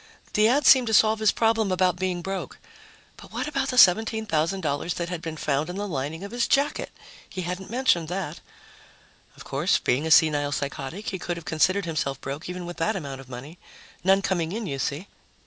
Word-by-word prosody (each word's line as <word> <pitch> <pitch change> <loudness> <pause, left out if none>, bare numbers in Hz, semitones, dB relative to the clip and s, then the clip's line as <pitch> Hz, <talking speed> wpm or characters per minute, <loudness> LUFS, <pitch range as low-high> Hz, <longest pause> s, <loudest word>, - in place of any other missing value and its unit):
The 215 +1 +4
ad 275 +5 +2
seemed 255 -3 +7
to 220 - +3
solve 215 0 +4
his 215 -1 +4
problem 225 -3 +1
about 180 -1 +2
being 180 -1 -2
broke. 195 +1 -5 0.6
But - - -14
what - - -3
about 275 -2 -1
the 255 - -2
$17,000 180 -7 +3
that 170 -1 -3
had 175 -2 -4
been 160 -1 -6
found 145 +2 -1
in 180 - -5
the 205 +1 -3
lining 155 +1 -4
of 200 - -7
his 240 0 0
jacket? 280 +2 +1 0.4
He 185 - -5
hadn't 180 +2 -5
mentioned 230 -9 +1
that. 175 -2 -4 1.0
Of - - -11
course, - - +1
being 140 +6 0
a - - -2
senile 150 -3 +4
psychotic, 140 +8 -4
he 190 - -5
could 175 0 -3
have 170 - -9
considered 185 +4 +1
himself 140 -4 -2
broke 140 +6 -6
even 180 0 -5
with 175 0 -7
that 210 +6 0
amount 140 -7 -5
of 130 - -16
money. 135 +7 -9 0.4
None 195 +1 +4
coming 170 -4 -1
in, 225 +1 -3
you 140 -6 -4
see. 150 +8 -3
180 Hz, 200 wpm, -25 LUFS, 155-205 Hz, 1.0 s, seemed